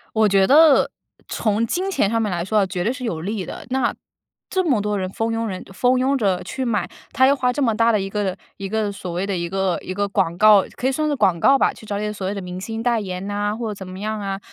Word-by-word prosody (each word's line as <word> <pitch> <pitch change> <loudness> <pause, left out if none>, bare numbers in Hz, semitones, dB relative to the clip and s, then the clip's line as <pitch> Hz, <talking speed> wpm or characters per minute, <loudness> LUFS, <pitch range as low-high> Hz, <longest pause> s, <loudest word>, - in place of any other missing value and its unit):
我 220 -1 +4
觉 195 -1 +3
得， 300 +1 +6 0.4
从 215 +1 0
金 370 - -1
钱 205 - +1
上 230 +1 +1
面 210 -3 -1
来 170 -1 -1
说 215 +3 +1
啊， 200 - +3
绝 185 -1 -3
对 220 - +1
是 260 - -8
有 175 -10 -3
利 200 +1 -3
的。 - - -8
那 255 -2 +1 0.6
这 375 0 +1
么 260 - +2
多 210 0 -1
人 185 -1 -2
蜂 225 +4 -2
拥 225 0 -1
人 185 -3 -5
蜂 250 +5 +2
拥 270 +2 +2
着 195 -6 +1
去 265 - -4
买， 215 -7 -1 0.2
它 260 -1 +4
要 280 - +4
花 250 -2 +1
这 285 +3 -3
么 230 -4 +2
大 230 +1 +3
的 215 - +2
一 195 - -3
个 195 -2 -2 0.2
一 195 -1 -5
个 215 -1 -1
所 185 -3 -7
谓 180 +3 -2
的 200 - -1
一 170 -1 -3
个 190 -2 0
一 185 - -5
个 205 +1 -1
广 190 -4 0
告 210 -1 +7
可 255 - -1
以 - - +2
算 305 +3 -1
是 290 - 0
广 185 -10 +2
告 275 +10 +5
吧， - - +2
去 - - -14
找 205 -1 -3
一 - - -3
点 210 0 -2
所 200 -2 -6
谓 195 - -2
的 200 - -5
明 180 0 -6
星 225 +3 -5
代 235 -1 +1
言 185 -2 -5
呐， 205 +1 -1
或 225 -3 -3
怎 190 -2 -9
么 185 +1 -8
样 215 +1 -3
啊。 195 -1 -3
210 Hz, 305 characters per minute, -21 LUFS, 190-235 Hz, 0.6 s, 告